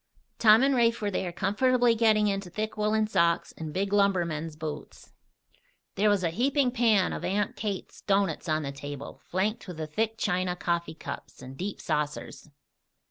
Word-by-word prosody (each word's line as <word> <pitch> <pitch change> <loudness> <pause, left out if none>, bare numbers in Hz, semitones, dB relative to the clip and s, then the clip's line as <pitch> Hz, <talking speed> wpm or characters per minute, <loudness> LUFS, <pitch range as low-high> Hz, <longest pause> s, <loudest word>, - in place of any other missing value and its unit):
Tom 220 +2 +7
and 275 0 +3
Rafe 235 -2 +3
were 205 -1 -1
there 185 -1 -2
comfortably 240 +7 +2
getting 220 -2 +3
into 195 -2 -1
thick 215 +4 -4
woolen 215 0 +1
socks 170 -5 +1
and 160 -1 -6
big 195 +4 -2
lumbermen's 170 -6 +1
boots. 155 -1 -8 0.8
There 210 +1 +2
was 205 -3 +2
a 165 - +1
heaping 260 - +1
pan 225 -6 +3
of - - -5
Aunt 205 +2 -1
Kate's 205 -3 -5
doughnuts 195 -3 0
on 155 0 +1
the 140 - -3
table, 145 0 -8
flanked 205 +6 -2
with 180 -3 -7
the 160 - -3
thick 220 +8 -2
china 180 -2 0
coffee 170 -2 -2
cups - - -8
and 130 +1 -9
deep 190 +7 -5
saucers. 150 0 -3
195 Hz, 170 wpm, -28 LUFS, 170-215 Hz, 0.8 s, Tom